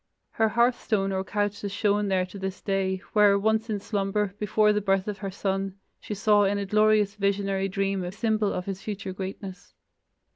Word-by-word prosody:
Her 220 0 +2
hearth 235 +2 +2
stone 195 -3 0
or 190 0 -1
couch 205 +1 -2
is 200 - -3
shown 205 0 +1
there 190 -1 +1
to 185 +2 -10
this 190 0 -4
day, 190 -1 -1
where 205 -2 +5
once 220 +2 +1
in 210 -2 -1
slumber, 200 0 -1
before 210 +1 +3
the 210 - 0
birth 195 -1 +1
of 205 -1 -4
her 195 - -4
son, 195 0 -2 0.2
she 210 - -6
saw 205 +1 +4
in 200 +1 +1
a 200 - -2
glorious 210 0 +3
visionary 200 -1 0
dream 195 -1 -1
a 175 - -4
symbol 215 0 0
of 180 - -3
his 195 -1 -5
future 200 -3 -5
greatness. 190 0 -7
200 Hz, 195 wpm, -26 LUFS, 195-210 Hz, 0.2 s, where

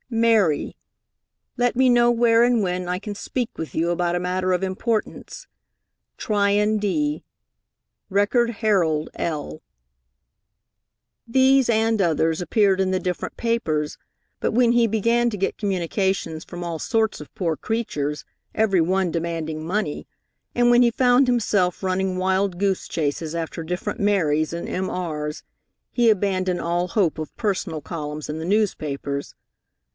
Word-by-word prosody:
"Mary," 225 - +2 0.8
let 245 0 +1
me 260 +1 +4
know 240 -1 +5
where 235 -1 +4
and 240 -2 +3
when 180 -1 -2
I 180 - 0
can 205 0 -6
speak 245 +3 -3
with 160 - -6
you 170 +2 +1
about 175 0 0
a - - 0
matter 185 +1 -1
of 180 +1 0
importance. 215 - -3 0.7
Tryon 210 0 +1
D., 295 +9 -1 0.9
Record 210 +5 +2
Herald 190 -9 +1
L. 145 - -4 1.6
These 265 +2 +4
and 225 -1 +2
others 165 -1 +1
appeared 195 0 +2
in 190 -1 +1
the 185 - +1
different 180 -1 -4
papers, 160 -11 -1 0.4
but - - 0
when 240 0 +3
he 240 -1 +4
began 230 +2 +2
to 210 - -5
get 195 - -1
communications 190 -3 -1
from 175 -1 -9
all 170 -2 -4
sorts 220 -3 0
of 150 - -12
poor 165 -4 -1
creatures, 150 - -3 0.3
every 200 -5 +2
one 185 +1 +1
demanding 160 -2 -3
money, 185 -3 -2 0.5
and 240 0 +3
when 240 0 +6
he 240 -1 +4
found 250 +1 +4
himself 205 -7 +1
running 185 0 0
wild 190 0 0
goose 195 -2 0
chases 155 0 -2
after 165 0 -4
different 180 +3 -4
Marys 155 -7 +1
and 170 0 -5
M.R.s, 165 -5 -3 0.5
he 240 -2 +3
abandoned 185 -3 +1
all 175 +2 -1
hope 175 -6 +1
of 155 - -6
personal 195 -6 -2
columns 150 -1 -6
in 150 +1 -4
the 160 - -4
newspapers. 150 -8 -1
190 Hz, 140 wpm, -23 LUFS, 165-225 Hz, 1.6 s, when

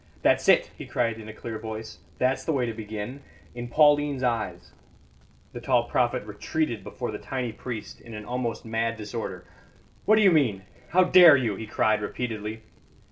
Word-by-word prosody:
"That's - - +3
it!" - - +5
he - - -9
cried 115 -2 -1
in 110 0 -9
a - - -5
clear 110 0 -7
voice. 110 0 -7 0.2
"That's 130 +1 +1
the - - -1
way 135 -5 +1
to 115 - -3
begin. 110 +4 -6 0.3
In 120 0 -6
Pauline's 145 0 +3
eyes 115 -3 -2 0.4
" 60 0 -31
The 120 - -7
tall 120 -1 +2
prophet 120 -4 0
retreated 110 +2 -2
before 120 +2 -5
the 105 - -6
tiny 130 -3 -3
priest 110 -1 -7
in 115 -2 -10
an 105 0 -7
almost 120 -1 -3
mad 115 0 -1
disorder. 105 -1 -6 0.6
"What 215 - +6
do 215 - +4
you 195 - +7
mean? 120 - +2 0.3
How 185 +2 +5
dare 180 -5 +8
you?" 115 -6 -1
he 110 +2 -7
cried 110 0 +1
repeatedly. 110 0 -4
115 Hz, 185 wpm, -26 LUFS, 110-130 Hz, 0.6 s, dare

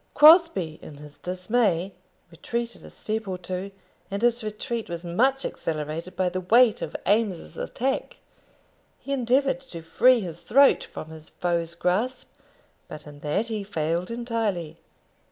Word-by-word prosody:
Crosbie, 300 - +6
in 150 - -10
his 145 0 -13
dismay, 185 0 0 0.4
retreated 235 +8 -4
a - - -11
step 220 0 -4
or 185 -1 -3
two, 185 +2 -5 0.4
and 200 +3 -4
his 240 -1 +2
retreat 220 +2 -4
was 170 0 -5
much 260 +10 +1
accelerated 160 +3 -4
by 185 +1 +1
the 185 +1 -2
weight 225 +4 +4
of - - -5
Eames's 205 -4 0
attack. 270 - -3 0.8
He 280 - -5
endeavoured 265 +1 +1
to 170 -11 -10
free 250 +9 +4
his 170 -5 -6
throat 275 +8 +4
from 155 - -9
his 160 -1 -10
foe's 170 -1 -2
grasp; 215 +9 -1 0.5
but 150 - -9
in 145 -1 -12
that 155 +11 -1
he 215 -2 -3
failed 170 -2 -2
entirely. 225 -9 -2
195 Hz, 145 wpm, -25 LUFS, 170-235 Hz, 0.8 s, Crosbie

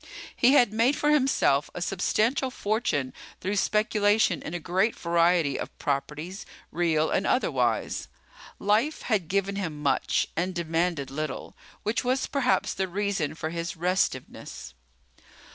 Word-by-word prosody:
He 250 +3 +5
had 240 -7 +5
made 235 +6 +3
for 295 0 +1
himself 265 - +3
a - - -4
substantial 220 +8 +1
fortune 205 - -1 0.3
through 200 +2 -2
speculation 210 -3 +2
in 165 - -6
a - - -2
great 190 +7 +1
variety 170 -3 +2
of - - -7
properties, 150 +7 -3 0.3
real 160 -2 +1
and 190 - +1
otherwise. 255 - 0 0.5
Life 220 +10 +1
had 205 -8 0
given 200 +2 0
him 165 -7 -4
much 145 -1 +1
and 180 +2 -1
demanded 165 -3 -1
little, 155 0 -5 0.3
which 215 +3 0
was 255 +1 +1
perhaps 275 -3 +1
the 190 - -1
reason 195 -5 -1
for 160 0 -4
his 170 0 -4
restiveness. 170 - -2
185 Hz, 135 wpm, -27 LUFS, 160-215 Hz, 0.5 s, He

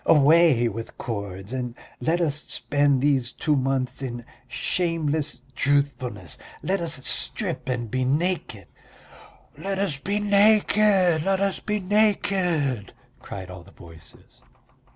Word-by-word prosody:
Away 150 -4 +5
with 115 +1 -6
cords 100 -2 -6
and 125 -2 -4 0.2
let 165 +7 0
us 155 -4 +1
spend 145 -2 0
these 135 -4 +1
two 150 - 0
months 130 -1 -1
in 120 -3 -5 0.2
shameless 155 -2 -1
truthfulness! 130 - -1 0.2
Let 195 0 0
us 160 -6 -2
strip 130 - -2
and 120 -4 -3
be 130 0 0
naked!" 165 +8 -1 0.9
"Let 195 0 -4
us 195 -8 -1
be 200 +7 -2
naked, 205 -4 +4
let 195 +3 +1
us 195 -1 0
be 210 0 -2
naked!" 180 - +1 0.3
cried 95 -2 -8
all 90 0 -9
the 90 - -17
voices. 80 -4 -16
145 Hz, 125 wpm, -24 LUFS, 125-180 Hz, 0.9 s, Away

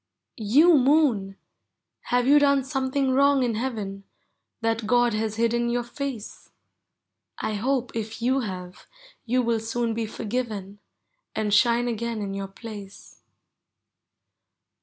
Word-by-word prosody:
You 285 +10 +5
Moon! 250 -9 +2 0.7
have 245 0 +1
you 290 +3 +6
done 280 -1 +3
something 270 0 -1
wrong 280 0 +4
in 240 -2 0
heaven, 215 -4 -4 0.6
That 225 0 0
Mod 240 0 +3
has 215 0 -1
hidden 235 +1 +1
your 240 0 0
face? 250 -3 -6 0.9
1 215 - -1
hope, 255 +3 -1
if 220 -1 -5
you 255 +3 +1
have, 180 -6 -7 0.4
you 250 +2 +2
will 230 -1 +1
soon 230 +1 -2
be 225 0 -2
forgiven, 210 -3 -4 0.6
And 210 -1 -1
shine 235 +2 +4
again 235 -1 -3
in 200 -2 -4
your 195 0 -4
place. 205 -1 -11
235 Hz, 125 wpm, -25 LUFS, 215-255 Hz, 0.9 s, you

